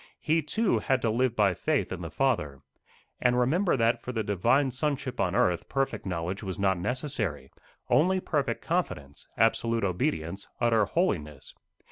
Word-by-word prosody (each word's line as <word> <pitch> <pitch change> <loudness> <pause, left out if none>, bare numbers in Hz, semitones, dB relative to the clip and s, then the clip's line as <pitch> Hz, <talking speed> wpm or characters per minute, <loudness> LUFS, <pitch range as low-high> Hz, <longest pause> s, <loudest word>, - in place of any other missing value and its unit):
He 160 +1 +1
too 210 +9 +1
had 135 -1 +1
to 115 - +2
live 120 +1 +1
by 100 -4 +3
faith 155 - -1
in 90 -1 -4
the 85 - -5
Father. 75 - -1 0.6
And 125 0 +3
remember 160 +7 +2
that 115 0 +2
for 125 - -5
the 115 -3 -2
Divine 120 +7 +2
Sonship 135 -1 -2
on 95 0 +1
earth 90 -4 +1
perfect 135 -7 -2
knowledge 90 +1 -3
was 95 -2 -5
not 95 -2 +1
necessary, 110 - -3 0.4
only 185 +4 +3
perfect 145 -6 -2
confidence, 75 - -3
absolute 115 0 +2
obedience, 95 - -2
utter 115 -3 +3
holiness. 80 - -2
115 Hz, 155 wpm, -28 LUFS, 95-135 Hz, 0.6 s, by